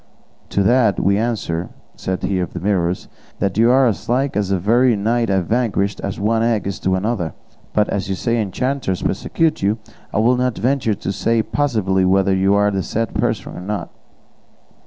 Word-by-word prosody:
"To 100 - +1
that 115 -2 +3
we 100 +2 +2
answer 95 -7 -2
you," - - -26 0.2
said 95 0 -4
he 95 -2 0
of 90 - -3
the 90 - -4
Mirrors, 90 -2 0 0.3
"that 100 -2 -1
you 115 +1 +5
are 130 +1 +5
as 115 -2 -1
like 135 +3 +1
the 100 -2 0
very 120 +6 +3
knight 115 +3 0
I 95 -1 +2
vanquished 105 -1 0
as 100 - -3
one 110 +3 +1
egg 115 -2 +1
is 100 - -4
like 95 0 +2
another, 100 -5 -2 0.4
but 105 -1 +2
as 100 -1 -2
you 95 - 0
say 115 +3 0
enchanters 115 -1 -2
persecute 165 -1 0
you, 100 +3 +1 0.3
I - - -2
will 120 +3 +3
not 125 -1 0
venture 120 -4 +1
to 100 - -4
say 115 +3 +1
positively 110 -10 0
whether 95 +1 +3
you 95 +1 +3
are 105 0 +3
the 95 -1 -1
said 115 +3 -2
person - - -2
or - - -7
not." 105 +2 -4
105 Hz, 195 wpm, -19 LUFS, 95-120 Hz, 0.4 s, you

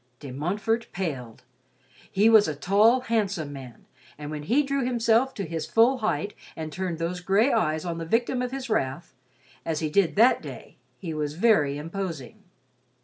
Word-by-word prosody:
De 140 - -8
Montfort 200 - -1
paled. 135 -12 -5 0.7
He 205 +3 +3
was 220 -2 +6
a 155 - -3
tall, 210 - +3
handsome 200 - -1
man, 130 -4 -11 0.3
and 150 0 -7
when 150 -1 -5
he 245 - +2
drew 275 -1 -1
himself 240 +1 +2
to 200 - -3
his 160 -1 -4
full 245 +4 +4
height 215 -2 -1 0.2
and 155 -1 -6
turned 185 -3 -3
those 170 +2 -3
gray 200 +8 +2
eyes 155 0 0
on 170 -1 -3
the 165 - -4
victim 240 +7 0
of 250 - -2
his 270 -1 -5
wrath, 135 - -2 0.5
as 160 -2 -2
he 155 -2 -2
did 195 -1 +2
that 235 +5 +5
day, - - -10 0.2
he 170 -4 -6
was 150 -1 -3
very 155 -8 +3
imposing. 165 - -6
190 Hz, 175 wpm, -26 LUFS, 155-225 Hz, 0.7 s, was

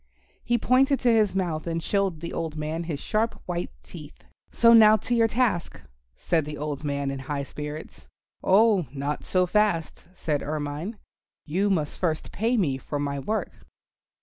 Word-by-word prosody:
He 240 - +1
pointed 265 +4 +3
to 245 - +4
his 215 -3 +3
mouth 170 -4 -2
and 165 0 -1
showed 195 -6 0
the 170 - -5
old 160 -2 -3
man 155 +2 -3
his 155 -4 -4
sharp 220 +6 -1
white 175 -1 -3
teeth. 150 -4 -12 0.3
"So 230 0 +5
now 215 -1 +8
to 240 - -3
your 230 -1 +4
task," 225 -7 0 0.4
said 165 -2 0
the 150 0 -6
old 150 -1 -4
man 140 -1 -1
in 135 - -5
high 140 +1 -3
spirits. 150 +2 -8 0.4
"Oh, 200 - +4
not 140 +1 -3
so 185 -1 +2
fast," 180 -6 0
said 150 -4 -1
Ermine, 150 +7 -4 0.5
"you 190 +7 0
must 155 -7 -1
first 160 -4 -1
pay 230 +4 0
me 140 -10 +1
for 145 - -4
my 140 -1 -2
work." 215 +11 -2
170 Hz, 170 wpm, -26 LUFS, 150-215 Hz, 0.5 s, now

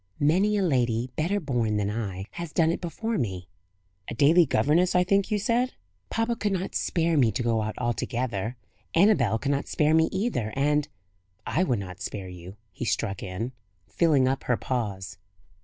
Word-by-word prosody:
Many 190 +8 +3
a 200 - +1
lady, 125 -6 +1
better 180 +7 0
born 120 - 0
than 105 0 0
I, 100 -4 -4
has 170 -2 -6
done 165 0 +3
it - - -3
before 220 +6 -2
me." 95 -7 -3 0.6
"A - - -5
daily 160 +6 +5
governess, 155 +7 +2
I 180 - +5
think 195 +2 +2
you 210 - +1
said?" 235 +5 0 0.4
"Papa 225 +1 0
could 205 -3 -1
not 190 0 -3
spare 165 -1 +1
me 120 -5 +4
to 125 - -2
go 115 -2 +1
out 110 0 -3
altogether; 120 -1 -2 0.4
Annabel 165 - +4
could 140 +5 -1
not 140 0 -1
spare 155 0 +2
me 160 0 +4
either; 190 - -1
and 150 +1 +2 0.3
" - - -44 0.2
"I 170 - +1
would 125 -9 +1
not 95 -1 -7
spare 100 -2 -5
you," 90 +1 -10 0.2
he 90 - -6
struck 105 -3 -1
in, 95 +7 -4 0.4
filling 150 -6 +3
up 135 +1 -1
her 125 - +1
pause. 100 -6 -3
135 Hz, 185 wpm, -26 LUFS, 110-175 Hz, 0.6 s, daily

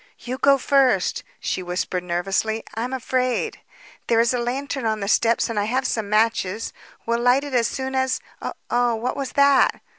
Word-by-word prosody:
"You 250 +2 -6
go 280 0 +5
first," 260 -8 +2 0.2
she - - -2
whispered 180 0 -3
nervously. 195 +5 -1
"I'm 230 +4 -3
afraid. 255 -1 -1 0.5
There 230 -1 +3
is 235 +2 +3
a 250 - 0
lantern 265 +2 -3
on 220 -1 0
the 200 - -3
steps 230 +2 +3
and 230 -2 -2
I 205 - 0
have 255 +4 0
some 220 -5 -1
matches. 215 -1 +1 0.3
We'll 235 0 0
light 245 +3 +3
it 285 -2 -6
as 235 -2 +3
soon 265 0 -4
as 260 0 +1 0.5
Oh, 240 -1 +2
what 240 +3 -2
was 275 -2 -4
that?" 280 -1 +4
235 Hz, 180 wpm, -23 LUFS, 220-260 Hz, 0.5 s, go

